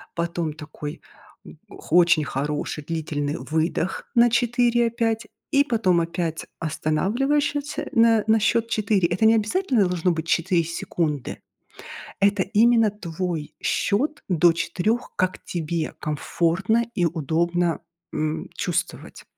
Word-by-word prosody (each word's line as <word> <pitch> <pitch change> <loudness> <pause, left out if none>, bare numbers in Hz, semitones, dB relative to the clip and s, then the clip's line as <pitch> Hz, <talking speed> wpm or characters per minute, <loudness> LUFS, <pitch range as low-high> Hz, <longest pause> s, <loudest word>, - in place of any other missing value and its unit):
потом 170 -2 -2
такой, 150 -1 -8 0.7
х 165 - -4
очень 170 -3 +5
хороший 145 +2 -3
длительный 150 -2 -3
выдох 160 +3 -2
на 240 0 +6
4 240 0 +2
опять, 230 -1 -1 0.3
и 280 -1 +5
потом 205 -10 +2
опять 165 -1 -3
останавливаешь 205 - 0
ща 290 0 -2
тся 290 - -5
на 230 -2 +4
на 220 0 +4
счёт 230 +2 +2
4. 200 -4 +1
Это 185 +6 0
не 225 +1 +6
обязательно 225 - +1
должно 180 0 +1
быть 160 0 -3
4 170 +1 +2
секунды. 155 -3 -3 0.8
Это 200 -1 +3
именно 225 +2 +4
твой 175 -5 -5
счёт 260 +10 +1 0.2
до 175 -1 +4
4, 190 +8 -1
как 185 0 0
тебе 165 -1 -3
комфортно 170 +8 0 0.2
и 175 - +4
удобно, 170 +2 0 0.3
м, 155 0 -2
чувствовать. - - -3
180 Hz, 125 wpm, -23 LUFS, 160-225 Hz, 0.8 s, на